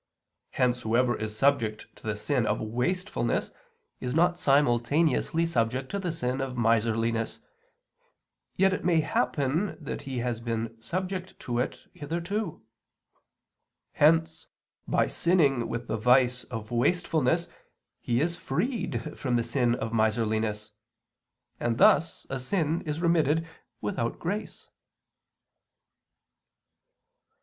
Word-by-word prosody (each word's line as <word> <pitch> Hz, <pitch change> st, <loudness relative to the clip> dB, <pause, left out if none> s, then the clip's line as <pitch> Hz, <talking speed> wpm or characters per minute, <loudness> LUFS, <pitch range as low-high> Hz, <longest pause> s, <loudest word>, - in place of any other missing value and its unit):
Hence 125 Hz, -1 st, +1 dB
whoever 120 Hz, +2 st, +2 dB
is 110 Hz, 0 st, -5 dB
subject 115 Hz, -6 st, +1 dB
to -, -, -11 dB
the 105 Hz, -, 0 dB
sin 120 Hz, +2 st, 0 dB
of 105 Hz, -, 0 dB
wastefulness 125 Hz, -, -1 dB, 0.5 s
is 125 Hz, +1 st, -3 dB
not 175 Hz, +1 st, +3 dB
simultaneously 145 Hz, +3 st, +2 dB
subject 130 Hz, -3 st, -1 dB
to 200 Hz, -, -1 dB
the 180 Hz, -3 st, -2 dB
sin 130 Hz, -4 st, -2 dB
of 130 Hz, -2 st, -4 dB
miserliness, 115 Hz, 0 st, +1 dB, 1.2 s
yet 190 Hz, 0 st, +3 dB
it -, -, -3 dB
may 170 Hz, -2 st, +3 dB
happen 140 Hz, +8 st, 0 dB
that 150 Hz, -, -5 dB
he 135 Hz, -2 st, -5 dB
has 120 Hz, -1 st, -2 dB
been 115 Hz, -1 st, -3 dB
subject 185 Hz, +5 st, -4 dB
to 120 Hz, -1 st, -2 dB
it 125 Hz, -, -3 dB
hitherto. 170 Hz, +5 st, -4 dB, 1.3 s
Hence 160 Hz, +2 st, +3 dB, 0.4 s
by -, -, +2 dB
sinning 145 Hz, -9 st, +2 dB
with 120 Hz, +1 st, -3 dB
the 110 Hz, -1 st, -2 dB
vice 125 Hz, +2 st, +3 dB
of 115 Hz, -2 st, -7 dB
wastefulness 160 Hz, +4 st, +1 dB, 0.5 s
he 120 Hz, +1 st, 0 dB
is 170 Hz, +2 st, 0 dB
freed 225 Hz, -, -2 dB
from 125 Hz, -3 st, 0 dB
the 120 Hz, -, +2 dB
sin 120 Hz, 0 st, +1 dB
of 115 Hz, -1 st, -4 dB
miserliness. 110 Hz, -1 st, 0 dB, 0.9 s
And 115 Hz, -1 st, 0 dB
thus 160 Hz, +6 st, +4 dB
a 135 Hz, -, -3 dB
sin 160 Hz, +3 st, 0 dB
is 155 Hz, +3 st, -3 dB
remitted 165 Hz, -1 st, +2 dB, 0.3 s
without 115 Hz, +2 st, -2 dB
grace. 200 Hz, +5 st, -4 dB
130 Hz, 120 wpm, -28 LUFS, 115-165 Hz, 1.3 s, thus